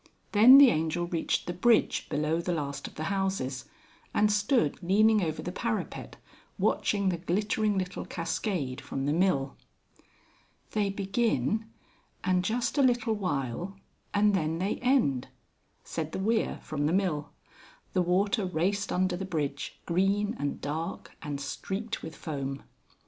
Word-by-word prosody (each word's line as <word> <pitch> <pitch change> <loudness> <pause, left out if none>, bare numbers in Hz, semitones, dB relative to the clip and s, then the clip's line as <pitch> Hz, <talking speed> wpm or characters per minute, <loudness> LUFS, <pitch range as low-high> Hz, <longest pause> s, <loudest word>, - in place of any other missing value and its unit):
Then 235 +6 +9
the 280 -3 +9
Angel 160 +1 0
reached 170 -2 -1
the 175 - -3
bridge 225 +6 +2
below 155 +3 0
the 175 +1 -1
last 140 -2 -4
of - - -13
the 155 - -4
houses, 190 -9 -1 0.5
and 210 0 +4
stood 205 - +1
leaning 210 +4 +4
over 160 -3 -2
the 180 - -3
parapet 220 +3 -3 0.4
watching 200 -2 +1
the 175 -2 -2
glittering 205 +4 0
little 185 -1 -3
cascade 165 - -3
from 135 0 -4
the 145 - +1
mill. 155 -6 +1 1.1
"They 210 -2 +1
begin, 205 - 0 0.5
and 185 0 +2
just 240 +7 0
a - - +6
little 240 -4 +3
while, 180 - -3 0.3
and 205 0 +3
then 160 -3 0
they 190 +4 -1
end," 245 - +2 0.6
said 160 -1 -4
the - - -2
weir 220 +3 0
from 145 -1 -1
the 160 - +1
mill. 170 -7 0 0.6
The 185 - +3
water 195 +5 +1
raced 190 +3 -1
under 185 0 +1
the 185 - -4
bridge, 150 -6 -3
green 200 +5 +1
and 145 0 -2
dark, 160 +5 -5
and 145 -2 -4
streaked 195 +11 -4
with 160 - -8
foam. 135 -3 -5
185 Hz, 145 wpm, -29 LUFS, 155-210 Hz, 1.1 s, Then